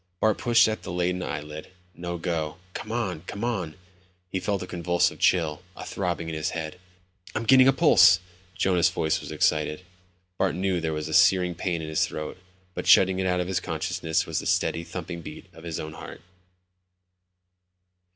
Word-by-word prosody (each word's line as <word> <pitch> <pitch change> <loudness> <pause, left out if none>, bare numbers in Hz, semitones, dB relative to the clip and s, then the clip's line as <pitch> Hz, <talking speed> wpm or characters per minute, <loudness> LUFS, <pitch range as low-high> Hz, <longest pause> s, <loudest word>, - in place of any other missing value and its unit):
Bart 110 -1 +2
pushed 120 -2 +5
at 110 0 -2
the - - -7
leaden 90 +1 -1
eyelid. 75 -2 -6 0.3
No 85 0 -5
go. 80 -2 -3 0.2
Come 110 - -6
on, 100 -9 -2
come 100 - -5
on. 95 -10 -2 0.6
He 95 - -1
felt 100 0 -2
a - - -5
convulsive 85 -1 0
chill, 80 -3 +2
a - - -8
throbbing 85 -3 -3
in 80 - -4
his 80 0 -2
head. 80 +2 -6 0.6
"I'm 110 - -1
getting 130 +2 +6
a - - +7
pulse." 95 - +6 0.4
Jonas' 95 -3 +3
voice 80 -2 -1
was - - -8
excited. 75 +3 0 0.5
Bart 95 -3 +1
knew 95 -1 0
there 80 -1 -1
was 75 -1 -3
a - - -5
searing 90 -2 +4
pain 85 -1 -2
in - - -5
his 80 0 +1
throat, 75 +3 -6 0.3
but - - -5
shutting 95 0 +6
it 95 - 0
out 90 0 +1
of 90 - -3
his 95 -1 0
consciousness 80 -2 -2
was - - -2
the - - -5
steady, 85 - +1
thumping 85 0 -6
beat - - -9
of 80 - -14
his 85 -2 -4
own 80 0 -6
heart. - - -10
90 Hz, 185 wpm, -26 LUFS, 80-95 Hz, 0.6 s, a